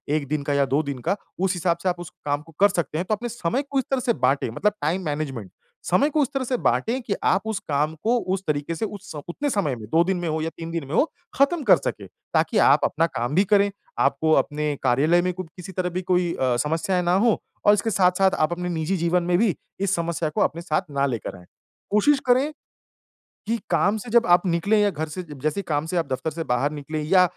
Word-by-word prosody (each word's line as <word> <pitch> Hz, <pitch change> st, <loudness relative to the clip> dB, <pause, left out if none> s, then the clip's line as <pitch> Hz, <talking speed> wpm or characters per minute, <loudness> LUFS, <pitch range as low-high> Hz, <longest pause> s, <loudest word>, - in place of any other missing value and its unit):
1 145 Hz, -3 st, -2 dB
दिन 150 Hz, 0 st, -2 dB
का 145 Hz, 0 st, -1 dB
या 140 Hz, 0 st, +3 dB
2 135 Hz, +3 st, +1 dB
दिन 140 Hz, -3 st, -5 dB
का, -, -, +3 dB, 0.2 s
उस 190 Hz, 0 st, +1 dB
हिसाब 175 Hz, -1 st, 0 dB
से 185 Hz, -, +2 dB
आप 175 Hz, 0 st, -2 dB
उस 175 Hz, -, -7 dB, 0.2 s
काम 145 Hz, 0 st, 0 dB
को 165 Hz, -, -17 dB
कर 205 Hz, -, +8 dB
सकते 165 Hz, -5 st, -2 dB
हैं, 175 Hz, -, -1 dB
तो 215 Hz, -, 0 dB
अपने 240 Hz, +3 st, -5 dB
समय 235 Hz, +4 st, -1 dB
को 275 Hz, -, +2 dB
इस -, -, 0 dB
तरह 265 Hz, -, +2 dB
से 240 Hz, -1 st, +1 dB
बाँटे 130 Hz, -2 st, +1 dB
मतलब 210 Hz, -, +1 dB
टाइम 165 Hz, +6 st, 0 dB
मैनेजमेंट। 140 Hz, -10 st, -4 dB, 0.4 s
समय 275 Hz, -, +3 dB
को 305 Hz, 0 st, +1 dB
इस -, -, 0 dB
तरह 270 Hz, -1 st, -1 dB
से 250 Hz, 0 st, 0 dB
बाँटे 240 Hz, +2 st, +1 dB
कि 200 Hz, -, 0 dB
आप 190 Hz, -, +3 dB
उस 220 Hz, -3 st, -2 dB
काम 150 Hz, +2 st, 0 dB
को 240 Hz, +2 st, +3 dB, 0.2 s
उस 195 Hz, -, -7 dB
तरीके 150 Hz, +2 st, -1 dB
से 220 Hz, -, -2 dB
उस 205 Hz, 0 st, -8 dB, 0.2 s
उतने 285 Hz, +12 st, -2 dB
समय 180 Hz, -, 0 dB
में 110 Hz, -, -8 dB
2 165 Hz, +1 st, +5 dB
दिन 190 Hz, 0 st, 0 dB
में 175 Hz, -, -3 dB
हो 155 Hz, 0 st, -1 dB
या 165 Hz, -, -1 dB
3 165 Hz, 0 st, -6 dB
दिन 165 Hz, -4 st, -3 dB
में 140 Hz, -, -7 dB
हो -, -, +5 dB, 0.3 s
खत्म 280 Hz, +3 st, +2 dB
कर 190 Hz, -7 st, +6 dB
सकें। 100 Hz, -7 st, -5 dB, 0.3 s
ताकि -, -, +2 dB
आप -, -, +4 dB
अपना 165 Hz, +2 st, +1 dB
काम 130 Hz, -1 st, -3 dB
भी 195 Hz, -, +5 dB
करें, 200 Hz, 0 st, +4 dB, 0.3 s
आपको 160 Hz, 0 st, +2 dB
अपने 150 Hz, 0 st, -3 dB
कार्यालय 145 Hz, +7 st, +3 dB
में 180 Hz, -, 0 dB
क 185 Hz, -, -3 dB
किसी 180 Hz, +1 st, -8 dB
तरह 185 Hz, -1 st, -2 dB
भी 180 Hz, +1 st, -3 dB
कोई 180 Hz, -1 st, +1 dB
अ, 130 Hz, -2 st, +1 dB
समस्याएँ 165 Hz, +6 st, 0 dB
ना 175 Hz, +1 st, +2 dB
हो 230 Hz, -, +3 dB, 0.3 s
और 205 Hz, -, +7 dB
इसके 210 Hz, +2 st, 0 dB
साथ-साथ 190 Hz, -1 st, +3 dB
आप 155 Hz, +2 st, +2 dB
अपने 180 Hz, +1 st, -4 dB
निजी 170 Hz, +2 st, -1 dB
जीवन 170 Hz, +1 st, +1 dB
में 175 Hz, 0 st, +2 dB
भी 205 Hz, -3 st, +2 dB, 0.2 s
इस 195 Hz, 0 st, +1 dB
समस्या 170 Hz, -1 st, -1 dB
को 150 Hz, -, -2 dB
अपने 165 Hz, -, 0 dB
साथ 155 Hz, -3 st, -1 dB
ना 140 Hz, 0 st, +1 dB
लेकर 115 Hz, -6 st, -4 dB
आएँ। 90 Hz, -, -15 dB, 0.5 s
कोशिश 270 Hz, +8 st, +4 dB
करें 260 Hz, +5 st, +3 dB, 1.0 s
कि 230 Hz, +2 st, +1 dB
काम 205 Hz, +2 st, +2 dB
से 235 Hz, -, -8 dB
जब 235 Hz, +1 st, +4 dB
आप 175 Hz, 0 st, +5 dB
निकलें 180 Hz, +5 st, +2 dB
या 205 Hz, -, +3 dB
घर 160 Hz, -3 st, -4 dB
से 170 Hz, +5 st, -6 dB
अ, -, -, -15 dB, 0.2 s
जैसे 155 Hz, +5 st, 0 dB
ही -, -, -5 dB
काम 150 Hz, 0 st, 0 dB
से 180 Hz, -, -3 dB
आप 165 Hz, -, 0 dB
दफ्तर 130 Hz, +5 st, -2 dB
से 165 Hz, +1 st, -5 dB
बाहर 125 Hz, +3 st, +1 dB
निकले 150 Hz, +1 st, -4 dB
या 185 Hz, +4 st, +5 dB
170 Hz, 255 wpm, -24 LUFS, 150-200 Hz, 1.0 s, कर